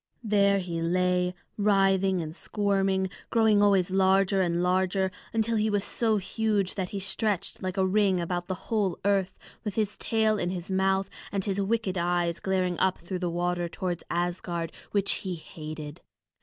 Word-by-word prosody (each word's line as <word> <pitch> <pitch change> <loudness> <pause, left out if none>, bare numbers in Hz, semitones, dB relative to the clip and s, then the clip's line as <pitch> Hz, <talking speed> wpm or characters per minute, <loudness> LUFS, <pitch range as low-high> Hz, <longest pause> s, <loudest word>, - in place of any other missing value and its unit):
There 200 -2 +3
he 175 -3 -3
lay 180 +1 +1 0.2
writhing 195 -3 +3
and 155 +1 -7
squirming, 195 -2 0 0.2
growing 220 -3 +4
always 195 -3 +3
larger 190 0 +3
and 175 -1 +1
larger, 185 +1 +1 0.2
until 225 0 +1
he 215 +1 +2
was 205 -1 +1
so 220 -1 +1
huge 205 -1 0
that 185 -3 -3
he 200 - -4
stretched 200 0 -1
like 185 0 -3
a 190 - +3
ring 195 -1 +3
about 175 +1 -2
the 185 - -2 0.2
whole 200 -5 +1
earth, 195 -2 +1 0.3
with 210 -3 -4
his 215 -2 0
tail 220 -2 +1
in 175 - -1
his 180 +1 -5
mouth, 190 0 +2 0.2
and 195 -2 -2
his 200 -1 0
wicked 195 -2 0
eyes 175 -1 0
glaring 185 -2 0
up 190 -1 +2
through 180 +2 -5
the 175 -1 -1
water 175 0 -1
towards 175 0 -3
Asgard 175 -1 -2 0.2
which 200 -1 +2
he 185 -2 -3
hated. 155 -1 -8
190 Hz, 170 wpm, -27 LUFS, 180-200 Hz, 0.3 s, growing